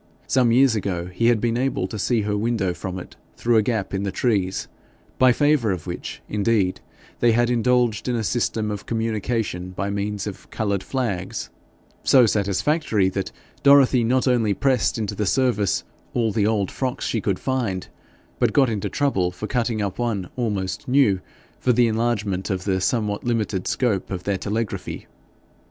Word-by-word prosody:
Some 125 -3 +3
years 130 0 +5
ago 95 -5 -2
he 115 +6 +1
had 120 -2 +4
been 115 +1 0
able 130 -7 0
to 110 +1 -6
see 115 +2 +1
her 105 0 -1
window, 105 -4 0
from 95 +1 -5
it 90 - -9 0.2
through 120 -1 +2
a - - +6
gap 110 -3 -2
in 95 - -1
the 100 -1 -2
trees, 95 -6 0 0.5
by 130 -1 +6
favour 145 -3 +2
of 90 -4 -4
which, 90 -1 -6
indeed, 105 -3 +1 0.4
they 120 -1 +4
had 120 +1 +2
indulged 120 -2 +2
in 125 - +1
a 115 - -1
system 110 0 -1
of 105 -1 -6
communications 110 -5 -2
by 100 +3 -2
means 100 0 -2
of 105 -3 -8
coloured 100 -3 -1
flags 105 -9 -3 0.5
so 130 -3 +6
satisfactory 105 - +1
that 95 0 -3 0.3
Dorothy 140 -3 +6
not 125 +3 +2
only 115 -5 +2
pressed 130 0 +1
into 110 -3 -2
the 105 - -2
service 120 -5 +1 0.3
all 115 -2 +2
the 105 -1 +1
old 105 -4 0
frocks 130 0 -3
she 115 - -1
could 100 -2 0
find, 120 -9 -2 0.5
but - - +2
got 135 -4 +4
into 105 -3 -2
trouble 95 -11 0
by - - -3
cutting 115 -2 -1
up 100 +2 -4
one 110 -7 -1
almost 105 -6 -2
new 125 -8 +4 0.4
for 125 - +2
the 120 +1 +4
enlargement 110 -4 -1
of 95 -2 -2
the 95 -2 0
somewhat 105 -1 0
limited 110 -6 -1
scope 110 -7 0
of 95 -2 -4
their 100 -2 -1
telegraphy. 110 +2 -3
110 Hz, 175 wpm, -23 LUFS, 100-120 Hz, 0.5 s, a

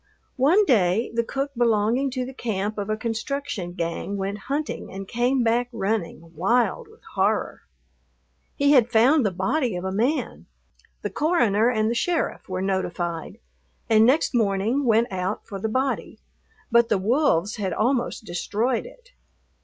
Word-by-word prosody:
One 330 +11 +4
day 215 - +2
the 235 0 +1
cook 275 +4 -3
belonging 235 +3 +2
to 255 -1 -3
the 265 - -8
camp 215 -4 -3
of 205 0 -4
a 215 - 0
construction 230 -4 -4
gang 170 +4 -3
went 200 +1 -3
hunting 295 +2 -3
and 195 0 -7
came 245 +3 +1
back 235 +2 +1
running, 195 -6 -3
wild 240 - +1
with 445 - -20
horror. - - 0 0.9
He 285 -1 +3
had 245 -5 +5
found 255 +6 +5
the 205 - +2
body 195 - -1
of 175 - -4
a 190 - -2
man. 240 +10 -1 0.6
The - - -3
coroner 240 - +2
and 215 -3 +1
the 230 - +1
sheriff 335 - -1
were 185 0 -2
notified, 175 -3 -3 0.5
and 220 0 +6
next 265 +7 +3
morning 225 +4 +1
went 230 +1 +3
out 190 +2 -3
for 200 -3 -7
the 220 - -2
body, 260 +4 -2 0.5
but 235 0 +4
the - - +3
wolves 210 - +1
had 195 -3 -2
almost 240 -1 0
destroyed 220 - -1
it. - - -17
230 Hz, 155 wpm, -24 LUFS, 195-260 Hz, 0.9 s, and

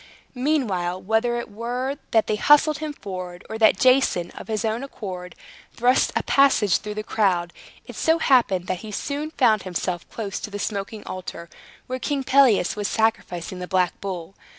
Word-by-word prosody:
Meanwhile, 230 - 0
whether 225 +4 +1
it - - -6
were 250 +6 -3
that 220 -1 +3
they 215 - 0
hustled 295 +4 +5
him 310 -1 -3
forward, 185 -7 -7
or 220 - -4
that 220 -3 +5
Jason, 255 -9 +3
of - - -10
his 220 0 -2
own 220 +3 -1
accord, 185 -9 -7 0.4
thrust 250 +2 +3
a - - +1
passage 270 -9 +4
through 210 0 -6
the 215 - -3
crowd, 180 -6 0 0.3
it - - -10
so 320 +1 +2
happened 240 - +3
that 185 -1 -2
he 215 - -8
soon 285 +8 -3
found 225 -9 +3
himself 180 -1 -4
close 210 -3 -5
to - - -6
the 205 - -5
smoking 205 +1 -4
altar, 175 -2 -7 0.3
where 255 +1 -4
King 275 +2 -1
Pelias 260 -9 +4
was 205 -1 -2
sacrificing 190 -5 -1
the 180 - -5
black 180 -2 0
bull. 185 -2 -5
215 Hz, 175 wpm, -23 LUFS, 185-255 Hz, 0.4 s, hustled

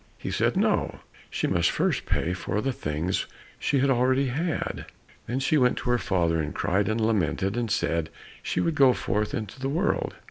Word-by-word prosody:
He - - -5
said, - - +1
"No," - - +1 0.3
she - - -2
must 85 -1 +2
first - - 0
pay 90 - 0
for 95 +2 -2
the 135 +4 -1
things 80 0 -2 0.3
she 140 - +1
had 140 0 +3
already 130 +2 +2
had. 160 +6 -2 0.4
Then 125 +2 -1
she 150 +3 +2
went 125 -1 +3
to 125 - -1
her 120 - +2
father 85 -6 +1
and 75 - -4
cried 100 +3 +1
and 110 +1 0
lamented, 105 -2 +1
and 120 -2 -1
said 85 -4 0 0.3
she - - -2
would 165 - +1
go 135 -4 +5
forth 105 -1 -1
into 110 +2 -5
the 135 +1 -2
world. 175 +8 0
115 Hz, 190 wpm, -26 LUFS, 95-135 Hz, 0.4 s, go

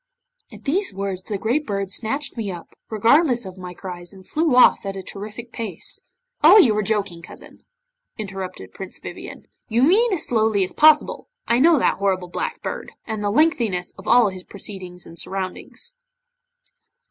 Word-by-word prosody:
'At - - -13
these 345 - 0
words 195 -1 -3
the 205 +2 -4
great 245 +9 0
Bird 195 -2 -2
snatched 265 +6 -2
me 215 -5 -3
up, 175 -2 -9 0.2
regardless 240 +3 +3
of 190 0 -9
my 180 -1 -8
cries, 175 -2 -8
and 190 -2 -15
flew 310 -4 +1
off 250 - +6
at 195 -1 -4
a 190 - -6
terrific 215 +5 -8
pace 215 -9 -6 0.2
' - - -41
'Oh! 345 +7 +9
you 245 - +6
are 215 - +1
joking, 200 -5 -1
cousin,' 170 - -13 0.5
interrupted 190 - -6
Prince 190 - -8
Vivien; - - -9 0.2
'you 235 +2 +2
mean 425 - +4
as 365 -6 0
slowly 220 -4 +2
as 185 - -3
possible. 305 0 +4 0.2
I 235 - +3
know 325 +3 +6
that 255 - +1
horrible 190 -2 0
Black - - -4
Bird, - - -5
and 220 -2 -4
the 205 - +1
lengthiness 225 - +1
of 190 - -14
all 240 -4 +6
his 185 -1 -8
proceedings 185 -3 -8
and 165 - -10
surroundings. 195 - -5
210 Hz, 175 wpm, -22 LUFS, 190-255 Hz, 0.5 s, Oh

